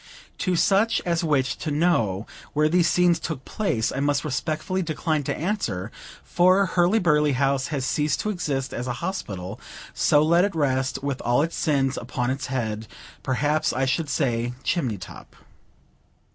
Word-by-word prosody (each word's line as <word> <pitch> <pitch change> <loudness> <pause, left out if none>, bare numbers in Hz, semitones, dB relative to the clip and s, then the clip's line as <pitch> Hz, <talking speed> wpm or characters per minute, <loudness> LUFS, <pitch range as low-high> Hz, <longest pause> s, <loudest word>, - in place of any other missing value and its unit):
To 185 -1 0
such 205 +6 +3
as 170 -1 0
wish 135 -5 +1
to - - -4
know 130 - +1 0.3
where 150 +1 +3
these 170 +1 +3
scenes 175 -2 +3
took 135 -5 -5
place, 125 - -1
I 135 - -3
must 145 +1 +1
respectfully 155 +6 -2
decline 155 -2 -1
to - - -2
answer; 120 - -2 0.3
for 185 +3 +4
Hurly 180 +3 +2
burly 150 -6 +3
House 135 0 +1
has 140 -4 -2
ceased 150 +3 0
to 215 - -1
exist 140 -8 -2
as 125 +2 -4
a 125 - -1
hospital; 100 - -5 0.3
so 145 0 +3
let 170 +3 +4
it 200 -3 -1
rest, 135 -2 0
with 140 -2 -2
all 120 +4 +2
its 165 - -3
sins 140 -4 +1
upon 125 +1 -2
its 135 -1 -3
head, 110 -4 -3 0.3
perhaps 145 +4 0
I 135 - 0
should 145 +4 -1
say 120 -4 0
chimney 130 - 0
top. 90 - -11
145 Hz, 165 wpm, -24 LUFS, 130-170 Hz, 0.3 s, for